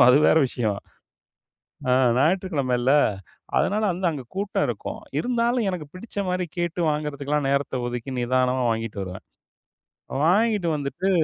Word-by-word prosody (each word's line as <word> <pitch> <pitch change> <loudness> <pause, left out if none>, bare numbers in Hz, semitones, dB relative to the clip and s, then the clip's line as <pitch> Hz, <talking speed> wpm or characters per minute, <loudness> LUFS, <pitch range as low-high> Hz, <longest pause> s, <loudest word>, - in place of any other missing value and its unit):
இருக்கும். 125 - +8
அது 135 - +6
வேற 160 - +5
விஷயம். 110 -5 -1 1.1
அ, - - +4 0.3
ஞாயிற்றுக்கிழமைல. 140 -7 +1 0.7
அதனால 215 +2 +1
அந்த 185 +2 -5
அங்க 140 - -5
கூட்டம் 200 +1 0
இருக்கும். - - -4 0.2
இருந்தாலும், 240 -1 +1
எனக்குப் 155 -6 -6
பிடிச்ச 200 +2 -5
மாரி 180 0 0
கேட்டு 175 0 -1
வாங்குறதுக்குகெல்லாம் 150 -1 -1
நேரத்த 140 -2 0
ஒதுக்கி, 120 +2 -5
நிதானமா 130 +1 +1
வாங்கிட்டு 115 -2 -3
வருவேன். 90 0 -8 1.0
வாங்கிட்டு 205 0 +3
வந்துட்டு 150 +7 -2
150 Hz, 130 wpm, -24 LUFS, 125-185 Hz, 1.1 s, இருக்கும்